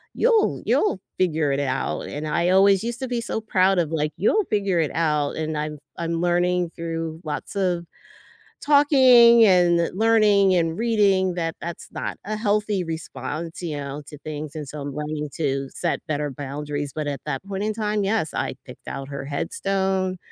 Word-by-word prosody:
you'll 460 -3 +2
you'll 220 - +2 0.2
figure 160 -5 +1
it 140 - 0
out," 130 -2 -2
and 150 +1 -5
I 170 +3 +1
always 195 +1 +5
used 235 +1 -4
to 260 - -2
be 240 -1 -2
so 230 - -3
proud 190 -3 +2
of, 160 -3 0
like, 155 -1 0
"You'll 415 - +2
figure 200 -4 +1
it 150 - -1
out," 150 -2 0
and 155 -1 -2
I'm 150 0 -3
f - - -15 0.2
I'm 165 0 -2
learning 175 0 +1
through 165 -1 -4
lots 150 +6 -5
of 180 -3 0 0.8
talking 260 -6 +7
and 175 -3 +4
learning 210 -4 +4
and 165 -1 0
reading 200 -5 +2
that 165 -2 -2
that's 170 0 -6
not - - -4
a 215 +1 -2
healthy 210 -3 0
response, 165 0 -6
you 155 -4 -3
know, 140 +1 -5
to 150 - -10
things, 150 -1 -6
and 150 -3 -5
so 150 -1 -7
I'm 140 -1 -5
learning 150 0 -4
to 135 -3 -1
set 170 - -2
better 150 -1 -1
boundaries, 145 +1 -5
but 155 -1 -3
at 140 -3 -4
that 150 +2 -3
point 195 0 -3
in 215 0 -1
time, 210 -1 -1
yes, 195 -6 0
I - - -2
picked - - -13
out 135 +1 -6
her 140 -1 -6
headstone, 190 +5 -1
170 Hz, 185 wpm, -23 LUFS, 150-200 Hz, 0.8 s, talking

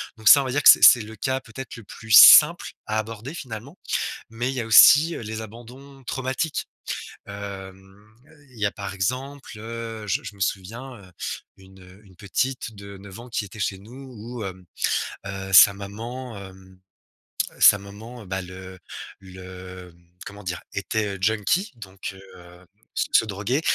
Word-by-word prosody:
Donc 110 -2 +2
ça, 140 - +9
on - - -4
va 130 - -3
dire 145 +2 -1
que - - +9
c'est - - +8
c'est 120 - +8
le 110 +1 -10
cas, 130 +5 -2
peut-être, 125 +2 -10
le 115 - -12
plus 110 +3 -11
simple 110 - +8 0.2
à 110 - -2
aborder, 115 +5 -7
finalement. 130 - -9 0.5
Mais 115 +3 -3
il 135 - -4
y - - -3
a - - -5
aussi, 150 +8 +7
heu, - - -7
les 110 0 -6
abandons 125 +5 -13
traumatiques. 130 +5 -3 0.6
Hem, 100 +1 -11 0.4
il 120 - -16
y 105 - -2
a, 100 - +2
par 100 -2 -7
exemple, 125 +5 -4
heu, 115 -1 -7
je 95 - 0
m - - -22
je - - -8
me - - -20
souviens, 115 +8 -4
heu, 95 -4 -17 0.5
une, 95 0 -18
heu, 90 +2 -17
une 95 -3 -20
petite 115 +4 -3
de 100 0 -11
9 95 +1 -12
ans 120 - -12
qui 115 - -3
était 105 +2 -13
chez 95 - -2
nous 125 +6 -13
où 115 +1 -8
hem, 95 -1 -8 0.6
heu, 95 0 -6
sa 100 - +9
maman, 115 +5 -8
hem, 95 -1 -13 0.8
sa 105 - +7
maman, 110 +4 -12
bah, 95 +1 -4
le 95 +1 -11 0.4
le, 95 -1 -11
hem, 85 0 -26 0.2
comment 100 0 -11
dire, 90 -1 -4
était, 100 +1 -3
heu, - - -13
junkie 110 - 0
donc 95 -3 -9
heu 95 - -15
heu, 90 +1 -16 0.3
se - - -1
se - - +4
droguait. 105 +7 -2
105 Hz, 185 wpm, -23 LUFS, 95-120 Hz, 0.8 s, ça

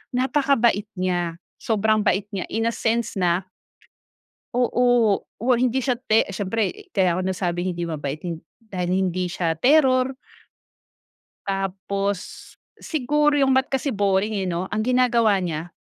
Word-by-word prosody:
napakabait 255 -6 +2
niya, 175 -2 -1 0.2
sobrang 215 0 +1
bait 195 +1 +2
niya 195 -2 -3
in 225 - -2
a 230 - +1
sense 230 -1 -1
na 180 +1 +1 1.1
Oo, 245 -3 +2 0.2
o - - -3
hindi 255 +1 +1
siya 250 0 0
te 225 -4 +3
siyempre 200 +1 -2
kaya 185 -3 +2
ako - - 0
nasabing 180 -1 -2
hindi 175 0 -3
mabait, 150 -1 -4
hin 170 -2 -4 0.3
dahil 180 -2 -2
hindi 185 -1 0
siya 170 -3 -2
terror. 260 - +3 1.3
Tapos 195 0 -2 0.6
siguro 295 0 +1
yung 270 -1 +3
math 265 +1 +1
kasi 270 -1 -1
boring, 200 +1 +1
eh, - - -2
'no. 175 +2 -2
Ang 215 - 0
ginagawa 235 -4 +3
niya 170 -2 -4
205 Hz, 135 wpm, -23 LUFS, 180-245 Hz, 1.3 s, te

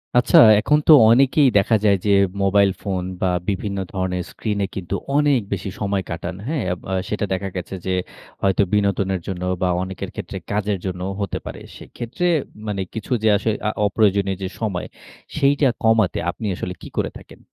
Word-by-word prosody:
আচ্ছা 125 - +5 0.2
এখন 150 +8 +3
তো - - +8 0.2
অনেকেই 135 +3 +5
দেখা 105 +3 +3
যায় 100 -2 +5
যে 100 - +3 0.3
মোবাইল 100 0 +4
ফোন 95 -3 -2 0.2
বা, 95 - +2 0.2
বিভিন্ন 100 0 -2
ধরণের 95 -2 -2
স্ক্রিনে 105 -3 -2
কিন্তু 95 0 -3 0.2
অনেক 145 -3 +3
বেশি 100 0 -4
সময় 100 -2 -1
কাটান। 85 +1 -5
হ্যাঁ? 150 -4 -1
আব 90 - -8
আ - - -1 0.2
সেটা 105 0 -1
দেখা 95 +1 -3
গেছে 90 +1 -5
যে 95 - 0 0.5
হয়তো 95 +1 +2
বিনোদনের 100 -2 +1
জন্য 90 -2 -4 0.2
বা, 90 - +2
অনেকের 95 0 -6
ক্ষেত্রে 100 -2 -6
কাজের 105 -1 0
জন্যও 95 0 -3
হতে 100 - -2
পারে। - - -7 0.2
সেক্ষেত্রে 125 +9 -4 0.4
মানে 100 -2 -2
কিছু 110 +1 -7
যে - - +3
আসো 110 - -2 0.4
অপ্রয়োজনীয় 100 -2 +1
যে - - -1
সময় 100 -5 -2 0.5
সেইটা 140 -1 +3 0.2
কমাতে 110 -7 +3
আপনি - - -8
আসলে 90 - -5
কী - - -9
করে - - 0
থাকেন? - - -16
100 Hz, 170 wpm, -21 LUFS, 95-110 Hz, 0.5 s, তো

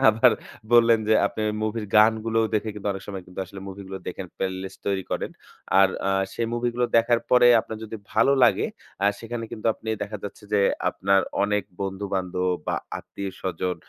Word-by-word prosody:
আবার 110 +1 +6 0.4
বললেন 115 -1 +6
যে 110 - +5
আপনি - - -5
ওই - - -1
মুভির 110 0 -2
গানগুলোও 110 +1 +4
দেখে 110 +1 0
কিন্তু 105 0 -4
অনেক 95 - -7
সময় 95 -2 -5
কিন্তু 90 - -13
আসলে 95 +1 -10
মুভিগুলো 95 0 -7
দেখেন 95 +1 -5
প্লেলিস্ট 95 0 -4
তৈরি 100 -1 0
করেন। - - -2 0.5
আর 95 - +6 0.2
আ - - +2 0.2
সেই 115 - -1
মুভিগুলো 120 0 0
দেখার 115 +1 +4
পরে 125 -1 +7
আপনার 110 - -7
যদি 110 +1 -6 0.2
ভালো 115 +6 +4
লাগে - - +3 0.4
আ - - +6
সেখানে 115 0 -5
কিন্তু 110 - -5
আপনি 110 - -10
দেখা 105 +1 -4
যাচ্ছে 105 +1 -8
যে 105 - +4 0.3
আপনার 95 0 +2 0.2
অনেক 105 0 +1 0.2
বন্ধু-বান্ধব 95 -2 -2 0.2
বা - - 0 0.2
আত্মীয়-স্বজন 95 -2 -4
105 Hz, 175 wpm, -25 LUFS, 95-115 Hz, 0.5 s, পরে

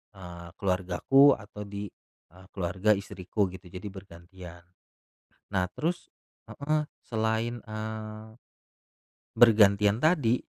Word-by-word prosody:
eee, 85 -2 -10
keluargaku 95 +9 +4
atau 105 0 -9
di 100 0 -6 0.4
eee, 95 +1 -17
keluarga 95 +2 0
istriku 100 +1 -2
gitu, 95 0 -11
jadi 90 0 -8
bergantian. 90 -2 -12 0.9
Nah, 95 -2 +2
terus 175 +3 -3 0.4
heeh, 150 +1 -1 0.2
selain, 110 +1 -1
eee, 110 0 -7 1.1
bergantian 105 -2 +5
tadi 145 -8 +3
105 Hz, 95 wpm, -28 LUFS, 95-110 Hz, 1.1 s, bergantian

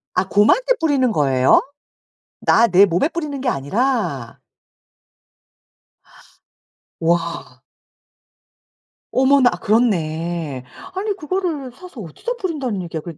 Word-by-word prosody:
아 185 +1 +1
곰한테 - - +3
뿌리는 280 -7 +2
거예요? 135 -6 +3 0.8
나 235 - +4
내 190 +2 +6
몸에 180 - +1
뿌리는 300 -5 -5
게 260 - -2
아니라? 190 - -1 2.6
와. 165 -6 -2 1.5
어머나 265 -1 +4
그렇네. 170 - -1 0.3
아니 405 +1 -2
그거를 320 -6 -3
사서 285 -4 -12
어디다 185 - -5
뿌린다는 275 - -3
얘기야 165 -2 -5
그랬 165 -2 -9
220 Hz, 215 characters per minute, -20 LUFS, -, 2.6 s, 내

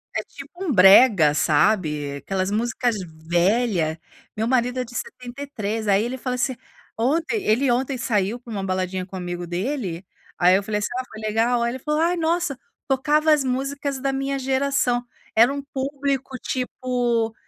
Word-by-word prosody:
É - - -1
tipo - - -12
um 340 - -1
brega, 190 - +7
sabe, 150 -3 +1
aquelas 190 +5 -2
músicas 235 +2 0 0.3
velha. 175 -3 +1 0.4
Meu 220 +1 -1
marido 250 0 +1
é - - 0
de 245 0 -12
73 245 - -5
aí 200 +1 +3
ele 250 +2 -3
fala 255 0 -3
assim 250 +1 -1 0.4
Ontem 325 - +1
ele 245 +4 +2
ontem 260 +2 0
saiu 220 -2 0
pra 240 -1 -12
uma 200 -3 -3
baladinha 185 -1 -2
com 190 - -10
amigo 175 -1 -5
dele, 185 - -3 0.3
aí 180 +1 +5
eu 195 - +2
falei 210 +1 -1
assim: 205 - -2
"Ah 255 - -2
foi 220 - -10
legal?" 225 +3 +1
Ai 235 - 0
ele 260 - -6
falou: 300 +3 -1
"Ai 345 +2 +2
nossa, 325 -5 0 0.3
tocava 300 +3 +2
as 295 -2 +2
músicas 275 +2 -2
da 270 +1 0
minha 275 +1 -1
geração, 265 -2 +1 0.3
era 235 +4 +6
um 280 0 -4
público, 270 -1 -2
tipo, 245 -3 -1
245 Hz, 170 wpm, -23 LUFS, 200-270 Hz, 0.4 s, brega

